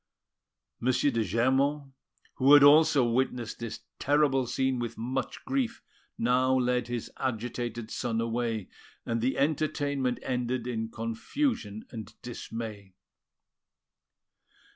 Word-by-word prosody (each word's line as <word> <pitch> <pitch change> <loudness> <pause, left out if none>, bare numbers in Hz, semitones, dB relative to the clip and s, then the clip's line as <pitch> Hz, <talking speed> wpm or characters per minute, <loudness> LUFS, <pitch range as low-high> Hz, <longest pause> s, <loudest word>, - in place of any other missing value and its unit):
M. 120 - -2
de 130 -2 +2
Germont, 135 +7 +1 0.5
who 135 +2 +7
had 145 - +8
also 145 -3 +6
witnessed 120 -1 -1
this 115 -2 -6 0.2
terrible 140 -3 +2
scene 130 +1 0
with 120 -1 -4
much 125 +3 -3
grief, 260 -4 -1 0.3
now 130 +2 +3
led 125 -1 +1
his 120 -2 -4
agitated 120 -2 -3
son 115 -2 -1
away; 115 -3 -1 0.4
and 115 -1 -1
the 130 +3 0
entertainment 145 -3 0
ended 125 -1 -1
in 110 -2 -3
confusion 115 - -2
and 110 -3 -9
dismay. 110 -5 -7
125 Hz, 110 wpm, -29 LUFS, 115-135 Hz, 0.5 s, had